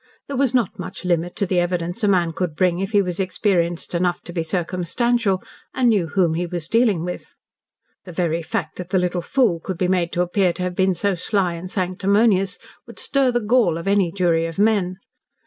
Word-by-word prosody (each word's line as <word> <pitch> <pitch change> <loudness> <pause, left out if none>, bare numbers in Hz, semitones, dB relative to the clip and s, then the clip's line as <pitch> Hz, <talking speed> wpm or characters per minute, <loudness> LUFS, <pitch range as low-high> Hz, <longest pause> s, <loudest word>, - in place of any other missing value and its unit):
There 280 - -5
was 260 -1 +1
not 235 -7 0
much - - -7
limit 175 0 0
to 200 - 0
the 185 -1 +1
evidence 175 +3 -2
a - - +4
man 175 -4 +2
could 170 -3 -3
bring 180 +1 +1
if 195 +2 -3
he 205 -2 +4
was 180 0 -4
experienced 180 -3 0
enough 175 0 0
to 175 - -9
be 170 - -1
circumstantial, 185 +5 0 0.3
and 250 -2 +3
knew 200 -7 +2
whom 175 -2 +1
he 175 +2 -2
was 170 -2 -4
dealing 220 -7 +2
with. 180 - -7 0.7
The 180 - -8
very 170 -1 -1
fact 160 - -4
that 180 -1 -6
the 190 - +2
little 180 -1 0
fool 230 -3 +1
could 185 +2 -5
be 180 - +1
made 180 -2 +1
to 175 - +2
appear 180 0 +1
to 180 - -4
have 180 -1 -3
been 190 0 +2
so 200 +2 0
sly 185 0 0
and 170 +2 -7
sanctimonious 195 0 +1 0.3
would - - -12
stir 275 -2 +1
the 240 -1 0
gall 215 -6 +2
of 165 - -6
any 195 -3 +2
jury 170 -3 +1
of 165 - -8
men. 200 -3 +2
180 Hz, 215 wpm, -21 LUFS, 175-200 Hz, 0.7 s, a